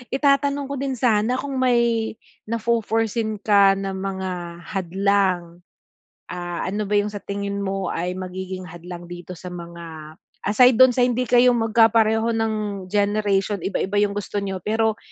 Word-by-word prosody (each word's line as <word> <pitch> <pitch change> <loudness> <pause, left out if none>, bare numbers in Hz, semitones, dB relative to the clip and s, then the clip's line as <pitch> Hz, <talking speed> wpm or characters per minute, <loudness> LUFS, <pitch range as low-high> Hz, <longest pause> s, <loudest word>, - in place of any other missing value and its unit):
Itatanong 280 0 +2
ko 280 - -3
din 275 -1 -1
sana 230 +1 +2
kung 275 0 -4
may 235 -3 +2 0.4
nafo-foreseen 225 -1 0
ka 200 -2 +5
na 195 0 -3
mga 185 -3 -5
hadlang? 185 -2 0 0.7
Ah, 175 -1 -4
ano 205 +1 -2
ba 205 - +2
'yong 205 +1 +1
sa 205 - -6
tingin 200 0 -4
mo 195 -2 -2
ay 180 +2 -3
magiging 185 0 -6
hadlang 175 +1 -9
dito 175 0 -8
sa 180 0 -8
mga 170 -3 -9 0.3
aside 245 +5 +5
do'n 255 +2 +7
sa 245 0 +2
hindi 250 0 0
kayo 245 0 +5
magkapareho 225 0 +3
ng 225 -1 0 0.4
generation, 205 -1 +1
iba 190 +1 -2
iba 195 - -2
'yong 205 -1 +2
gusto 205 0 -3
niyo, 190 -1 -3
pero 220 0 +1
205 Hz, 150 wpm, -22 LUFS, 185-225 Hz, 0.7 s, do'n